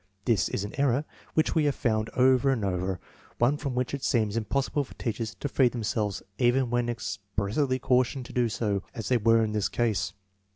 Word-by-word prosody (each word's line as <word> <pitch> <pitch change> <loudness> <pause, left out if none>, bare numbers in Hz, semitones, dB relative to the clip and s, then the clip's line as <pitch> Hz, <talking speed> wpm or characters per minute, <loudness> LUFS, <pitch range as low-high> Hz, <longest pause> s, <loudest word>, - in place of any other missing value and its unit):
This 115 -3 +2
is 100 - -2
an 105 - -6
error 140 +1 +2 0.3
which 155 - +2
we 155 -2 +2
have 145 - +2
found 110 -2 0
over 130 +1 +4
and 120 -6 +1
over, 90 -1 -1 0.4
one 120 +5 +3
from 140 -3 -4
which 125 +1 -1
it 140 - -4
seems 110 -3 +1
impossible 140 +5 0
for 135 - -14
teachers 110 -2 -3
to 145 - -4
free 130 -2 +3
themselves 110 -3 -2 0.2
even 125 0 +3
when 120 0 +1
expressly 100 +5 -1
cautioned 125 0 +1
to - - -11
do 120 -2 +2
so, 105 -3 -1
as 115 - -4
they 125 - +4
were 115 0 +4
in 110 - -1
this 105 -2 0
case. 105 -4 0
120 Hz, 200 wpm, -28 LUFS, 105-130 Hz, 0.4 s, over